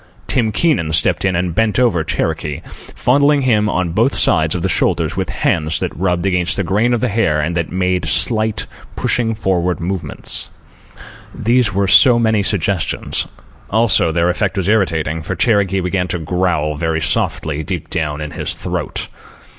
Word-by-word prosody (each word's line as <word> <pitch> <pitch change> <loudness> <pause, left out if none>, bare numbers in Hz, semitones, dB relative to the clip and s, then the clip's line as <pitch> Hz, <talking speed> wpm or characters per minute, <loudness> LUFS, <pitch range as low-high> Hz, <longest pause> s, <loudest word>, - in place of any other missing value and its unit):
Tim 115 -4 0
Keenan 105 - +1
stepped 80 - +2
in 95 -2 +1
and 90 -1 -1
bent 110 +1 +1
over 115 -10 +2
Cherokee, 80 -1 -2
fondling 140 +2 +1
him 110 -4 +2
on 90 -4 -1
both 115 +9 +1
sides - - +2
of - - -3
the - - +2
shoulders - - +1
with - - -2
hands 80 -1 0
that - - -3
rubbed 90 0 -1
against 90 -2 +1
the 100 - 0
grain 105 +7 +1
of 115 - -3
the - - +1
hair 100 -8 +1
and 80 +3 -1
that 85 -2 -2
made 90 0 0
slight, 110 -2 +1 0.3
pushing 115 -2 0
forward 90 -3 -1
movements. 85 -3 -4 0.9
These 115 -3 +1
were 100 0 +1
so 125 +5 +6
many 110 -3 +2
suggestions. 100 -2 -1 0.4
Also, 110 -6 +3
their 85 +2 +1
effect 95 +1 -2
was 95 -2 -1
irritating, 80 -7 0
for 80 - -4
Cherokee 100 -4 +2
began 90 0 -1
to 90 - -2
growl, 80 -2 -1
very 80 0 -1
softly, 80 -1 -1
deep 75 - -5
down 75 -1 -2
in 75 -1 -5
his - - -2
throat. - - -4
95 Hz, 170 wpm, -17 LUFS, 80-110 Hz, 0.9 s, so